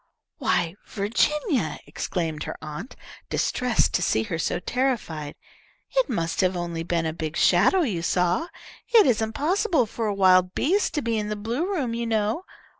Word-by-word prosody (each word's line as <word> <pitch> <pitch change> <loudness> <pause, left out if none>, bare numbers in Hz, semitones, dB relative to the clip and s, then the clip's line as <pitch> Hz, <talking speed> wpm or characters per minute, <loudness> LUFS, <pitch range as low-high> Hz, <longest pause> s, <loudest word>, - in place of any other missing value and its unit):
"Why, 165 -1 +1
Virginia," 240 - 0
exclaimed 160 -4 -3
her - - -5
aunt, 155 - -7 0.3
distressed 250 -3 +1
to - - +2
see 110 -9 +1
her 165 +8 -4
so - - -1
terrified, 180 - -2 0.6
"it - - +3
must 165 +2 -1
have 185 0 +2
been 180 - -3
only 170 -1 -3
a 165 -1 -1
big 160 0 -4
shadow 195 - +4
you 205 - -1
saw. 180 - +1 0.4
It 455 -4 +6
isn't 220 -2 +1
possible 335 - +1
for 225 +1 -3
a 205 - -1
wild 185 -1 +4
beast 385 +7 +1
to 295 - -1
be 230 -1 0
in 210 0 -3
the 210 - -2
blue 235 - -2
room 270 -11 -1
you 235 0 -2
know. 220 - 0
210 Hz, 170 wpm, -25 LUFS, 170-265 Hz, 0.6 s, It